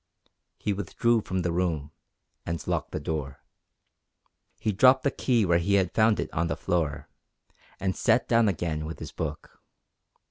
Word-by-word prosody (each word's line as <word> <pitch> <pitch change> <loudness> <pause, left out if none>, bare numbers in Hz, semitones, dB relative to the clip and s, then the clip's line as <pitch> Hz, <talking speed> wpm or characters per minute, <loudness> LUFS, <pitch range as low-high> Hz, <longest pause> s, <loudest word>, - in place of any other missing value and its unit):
He 105 - -1
withdrew 110 +4 +1
from 95 -2 -2
the 85 - 0
room, 85 -4 -1 0.5
and 85 0 -4
locked - - -1
the - - -4
door. 75 -4 -4 1.2
He 110 - 0
dropped 130 +6 +5
the 140 - +2
key 120 -7 +1
where 85 -1 +3
he 100 +4 +1
had 95 -3 +1
found 110 -1 +3
it - - -3
on 80 +2 0
the - - -2
floor, 75 -5 -1 0.7
and 95 -1 -1
sat - - +2
down 115 -1 +4
again 80 -4 -2
with 80 - -6
his - - -8
book. - - -6
90 Hz, 165 wpm, -27 LUFS, 80-110 Hz, 1.2 s, dropped